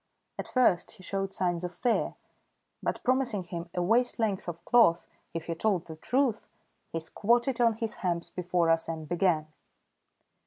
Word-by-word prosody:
At - - -4
first 225 -9 +2
he 200 -4 -14
showed 195 +1 -2
signs 175 -2 -1
of 180 0 -4
fear, 245 -2 0 0.7
but - - -2
promising 245 -6 +1
him 170 -1 -6
a 180 - +1
waist 235 +6 +2
length 210 -5 -1
of 170 -1 -6
cloth 225 -9 +5 0.3
if 165 -1 -3
he 170 - -2
told 180 0 0
the 160 - -8
truth, 245 - 0 0.4
he 165 - -2
squatted 235 - +1
on 230 -1 +5
his 225 -1 -2
hams 170 -2 -1
before 175 -2 +1
us 165 0 +1
and 160 -2 -5
began. 165 -3 +1
180 Hz, 165 wpm, -29 LUFS, 170-230 Hz, 0.7 s, cloth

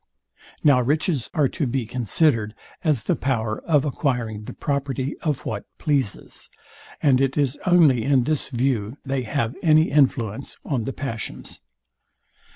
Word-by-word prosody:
Now 140 -4 +5
riches 145 +1 0
are 150 -3 +3
to 150 -6 -2
be 125 0 -1
considered 115 - +1 0.3
as 150 - +1
the - - +1
power 115 -5 -1
of 150 -3 +3
acquiring 120 -7 -2
the - - -7
property 140 -1 -2
of 150 -5 -2
what 105 -2 -4
pleases; 140 -8 -2 0.5
and 135 -3 +4
it 135 +1 0
is 140 -2 0
only 155 -10 +5
in 135 0 +3
this 150 +2 -1
view 125 -2 -1
they 135 -1 -1
have 125 0 -2
any 155 -1 +4
influence 130 -4 +1
on 125 -7 -1
the 135 - -3
passions. 115 -6 -6
135 Hz, 145 wpm, -23 LUFS, 115-145 Hz, 0.5 s, Now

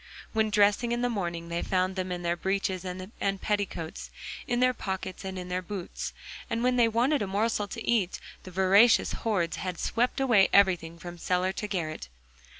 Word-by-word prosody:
When 220 -1 +2
dressing 210 +3 +3
in 240 +1 0
the 245 - +1
morning 170 -5 -3
they 170 0 -1
found 185 0 0
them 185 -1 -3
in 175 0 -3
their 170 0 +1
breeches 190 0 -1
and 190 +2 -3
petticoats, 200 -6 -3 0.4
in 245 -1 0
their 255 0 +4
pockets 190 -4 -5
and 190 -1 -5
in 180 -1 -5
their 180 0 -2
boots; 185 0 -5 0.4
and 230 +1 -1
when 250 0 +3
they 240 -2 +5
wanted 245 +6 +2
a 205 - -1
morsel 205 +1 0
to 225 +3 -7
eat, 215 -7 +1 0.2
the - - -10
voracious 190 +5 +5
horde 185 -7 -1
had 180 -2 -4
swept 245 +3 0
away 235 -8 +5
everything 175 -4 +3
from 175 0 -9
cellar 180 +2 +1
to 210 - -4
garret. 155 - -3
190 Hz, 185 wpm, -28 LUFS, 180-225 Hz, 0.4 s, they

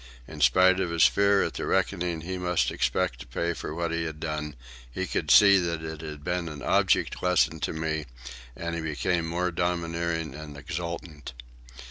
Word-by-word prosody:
In - - -9
spite 95 0 +5
of 95 -2 0
his 85 0 +3
fear 100 0 +4
at - - -3
the - - -4
reckoning 85 -2 0
he 90 +3 -5
must 90 -1 +1
expect - - 0
to - - -10
pay 85 +8 -2
for 80 - -6
what 85 -1 -2
he 85 0 -1
had 80 -1 -6
done, 75 -2 -4 0.4
he - - -3
could - - -2
see 100 -2 +8
that 85 -2 -2
it 80 -1 -6
had 75 -2 -8
been 90 0 -2
an 75 -2 -8
object - - +2
lesson 90 -3 +2
to - - -2
me, 80 -1 -3 0.5
and 85 0 -4
he 85 - -3
became 80 +2 -1
more 90 +2 -1
domineering 85 -2 -2
and 75 0 -9
exultant. 85 -2 -6
85 Hz, 185 wpm, -27 LUFS, 80-90 Hz, 0.5 s, see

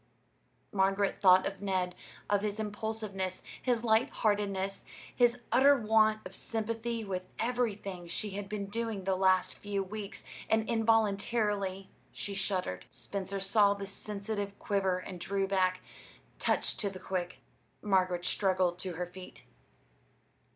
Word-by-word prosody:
Margaret 195 0 +1
thought 185 -1 +7
of 195 -1 -4
Ned, 185 -2 0 0.3
of 205 -1 +2
his 210 0 -2
impulsiveness, 210 -3 -3 0.2
his 240 -3 +1
light 225 +1 +4
heartedness, 200 -2 0 0.3
his 240 -1 +4
utter 280 +2 +6
want 215 -1 +4
of 185 - -8
sympathy 225 +2 -2
with 185 -2 -4
everything 210 -7 -2
she 205 +4 -2
had 200 0 -5
been 210 -1 -3
doing 220 -1 -3
the 190 0 +1
last 185 -1 +3
few 200 -1 -2
weeks; 205 +1 -7 0.3
and 220 0 +2
involuntarily 210 -3 +1 0.2
she 200 - -5
shuddered. 190 - -2
Spencer 195 0 -5
saw 200 +1 +4
the 200 0 -5
sensitive 200 0 -4
quiver 195 -2 +1
and 185 0 -7
drew 195 +2 0
back, 185 -1 +2 0.6
touched - - +1
to 205 - 0
the 190 - -8
quick. 180 -1 -3 0.5
Margaret 185 -3 +2
struggled 185 -3 +1
to 185 -1 -4
her 180 +2 -3
feet. 180 +1 -11
200 Hz, 135 wpm, -32 LUFS, 190-215 Hz, 0.6 s, thought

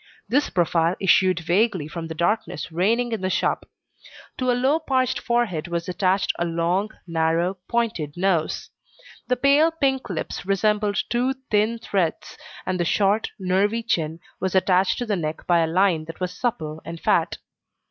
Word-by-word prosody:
This 280 +4 +1
profile 170 0 +1
issued 185 -2 +3
vaguely 180 -1 +1
from 165 +1 -6
the 160 - -6
darkness 180 0 -1
reigning 225 +8 +1
in 225 -4 -2
the 185 - 0
shop. - - -1 0.7
To 255 -1 0
a - - +4
low 270 +5 +2
parched 260 -5 0
forehead 235 -10 0
was 170 -1 -3
attached 185 +1 +1
a - - +1
long, 170 +4 0 0.2
narrow, 165 +2 0
pointed 220 -11 -1
nose; 175 -4 0 0.6
the 250 - +2
pale 280 +5 +4
pink 275 -6 -1
lips 175 -4 -4
resembled 205 +2 +1
two 250 +2 +1 0.2
thin 215 +2 +2
threads, 190 -7 -2 0.3
and 185 -1 -1
the - - +2
short, 200 +5 +2
nervy 200 +4 +1
chin 165 -7 -1 0.2
was 190 0 -2
attached 185 0 +3
to 245 - -2
the 210 -3 0
neck 155 -3 -4
by 175 -1 +3
a 165 - +2
line 170 -2 +2
that 165 0 -9
was 180 -1 -3
supple 160 -11 -3
and 165 0 -7
fat. - - +1
190 Hz, 165 wpm, -23 LUFS, 170-230 Hz, 0.7 s, a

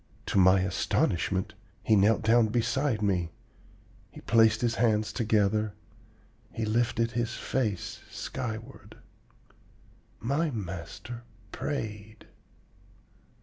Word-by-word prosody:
To - - +1
my 95 +1 +6
astonishment 95 0 0 0.3
he 110 - +4
knelt 105 +2 +4
down 115 +1 +5
beside 120 +1 0
me, 90 -4 +1 0.8
he - - -12
placed 110 -1 +4
his 120 -1 +1
hands 110 -2 +2
together, 105 -2 +1 0.8
he 115 - -3
lifted 115 +1 +1
his 120 -1 -2
face 110 -8 -2
skyward. 115 -3 -6 1.2
My 145 +8 0
master 105 - -6 0.3
prayed! 110 -6 -5
110 Hz, 95 wpm, -28 LUFS, 100-120 Hz, 1.2 s, my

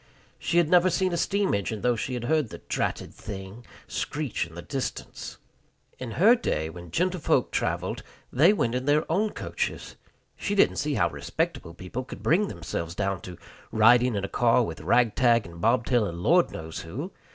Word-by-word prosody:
She 170 - 0
had 170 -2 +5
never 180 +2 +5
seen 185 +1 0
a - - +1
steam 200 +3 +1
engine, 100 +1 -2
though 125 -1 +2
she 125 +3 -3
had 120 - -4
heard 150 -1 +1
"the - - -8
dratted - - -3
thing" 100 +2 -8 0.2
screech 145 - -3
in 80 - -15
the 85 - -7
distance. 135 -2 -5 0.6
In 125 -3 -5
her 210 +7 +6
day, 80 - -1
when 85 0 -10
gentlefolk 180 - +1
traveled, - - -1 0.3
they 155 +9 +6
went 120 - 0
in 125 +1 -2
their 150 +2 +3
own 210 +6 +2
coaches. - - -4 0.4
She 205 - -2
didn't 200 - +4
see 145 0 -1
how 85 -6 +2
respectable 85 - -3
people 95 +9 -5
could - - -10
bring 195 +7 +3
themselves 85 -1 -5
down 100 -2 -1
to 90 -2 -9 0.3
"riding 120 +2 +5
in 100 -1 -1
a - - -4
car 120 +2 +3
with 80 -8 -5
rag 115 +6 +3
tag 120 -2 +3
and 85 -1 -11
bobtail 120 -1 +2
and 85 0 -6
Lord 175 +2 +4
knows 80 0 -7
who." 135 - -6
120 Hz, 185 wpm, -26 LUFS, 95-160 Hz, 0.6 s, her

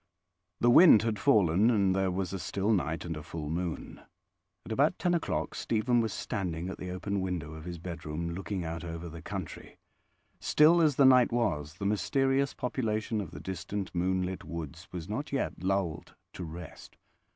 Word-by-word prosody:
The 120 - +5
wind 135 - +8
had 110 -2 -1
fallen, 105 - +4
and 100 -5 +3
there 95 -1 +1
was 90 0 -2
a 95 - -3
still 100 +4 0
night 85 -4 -1
and 85 -1 -3
a 75 - -6
full 75 0 -6
moon. 85 0 -4 0.6
At - - -8
about 145 +9 +2
ten 175 -1 +1
o'clock 170 - -1
Stephen 115 +2 +1
was 110 -2 -1
standing 90 -5 -3
at - - -7
the 90 - -5
open 95 +2 -2
window 90 -5 -3
of 80 0 -9
his 90 -1 -5
bedroom, 85 -1 -5
looking 95 0 -4
out 80 0 -4
over 85 0 -6
the 85 0 -9
country. 95 -4 -7 0.6
Still 165 +3 +5
as 150 -4 +3
the 140 - +5
night 125 -2 +6
was, 80 -11 -1
the 100 - -5
mysterious 135 +6 +1
population 110 -4 -1
of 95 - -6
the 85 - -9
distant 95 +2 -5
moon 95 +1 +1
lit 90 0 -4
woods 85 0 -7
was 90 -2 -6
not 130 +7 -4
yet 140 - -2
lulled 90 -3 -1 0.2
to 90 - -6
rest. 85 +2 -10
95 Hz, 185 wpm, -30 LUFS, 85-115 Hz, 0.6 s, wind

